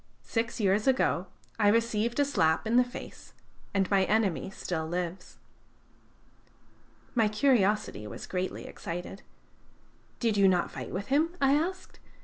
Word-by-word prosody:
Six 230 +1 -2
years 205 +1 +2
ago 250 -8 +2 0.3
I 210 - +4
received 230 +2 +1
a 285 - +4
slap 160 - +1
in 225 +2 +1
the 250 - +7
face, 245 +1 -10 0.4
and 195 -2 +1
my 195 -1 +4
enemy 205 -5 +1
still 165 -4 -4
lives." 180 +1 -4 1.8
My 225 -3 +3
curiosity 210 - +1
was 100 - -8
greatly 185 0 -3
excited. 175 +3 -6 1.0
"Did 225 -4 +1
you 200 -1 +6
not 180 -2 +2
fight - - -6
with 195 +3 -4
him?" 320 +6 +1
I 275 0 +4
asked. 350 +6 -2
210 Hz, 135 wpm, -29 LUFS, 185-240 Hz, 1.8 s, the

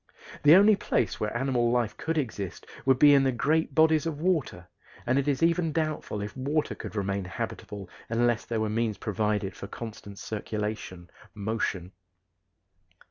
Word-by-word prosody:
The 150 +3 +8
only 205 +3 +7
place 200 - -1
where 105 +2 -2
animal 125 -2 +1
life 120 -3 0
could 165 0 -3
exist 110 - -4 0.2
would 130 -1 +5
be 145 +2 +7
in 140 - +6
the 135 - +2
great 150 +7 0
bodies 160 0 +4
of 150 -3 -4
water, 170 -5 -1 0.4
and 130 +3 +2
it 140 - -2
is 140 +1 +1
even 165 -1 +2
doubtful 155 -9 -2
if 105 - -7
water 145 +4 -1
could - - -8
remain 100 -1 -1
habitable 95 +1 -6 0.2
unless 120 0 +1
there 115 -2 -2
were 110 - 0
means 110 0 -1
provided 105 -2 -1
for 100 - -8
constant 105 -3 -8
circulation 105 -5 -5 0.2
motion. 100 -4 -2
120 Hz, 160 wpm, -28 LUFS, 105-150 Hz, 0.4 s, The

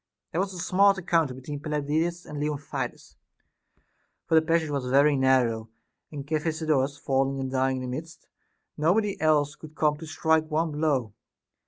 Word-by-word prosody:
There 170 - 0
was 195 0 -2
a - - -7
smart 195 +3 +3
encounter 165 -7 +1
between 140 +3 -7
Pelopidas 155 +4 -1
and 150 - -7
Leontidas, 145 -1 -4 1.1
for 165 - -3
the 160 - +7
passage 160 -1 +1
was 140 -3 -2
very 140 +3 +4
narrow, 125 -4 +2 0.4
and 145 -3 -6
Cephisodorus 155 -3 0
falling 135 -1 0
and 130 -1 -3
dying 130 0 +1
in 130 - -4
the - - -4
midst, 165 0 -10 0.5
nobody 195 +7 +1
else 150 -2 +3
could 155 0 -13
come 150 -1 +2
to 160 +1 -9
strike 160 0 +1
one 160 +1 0
blow. 145 -8 0
150 Hz, 160 wpm, -26 LUFS, 135-160 Hz, 1.1 s, the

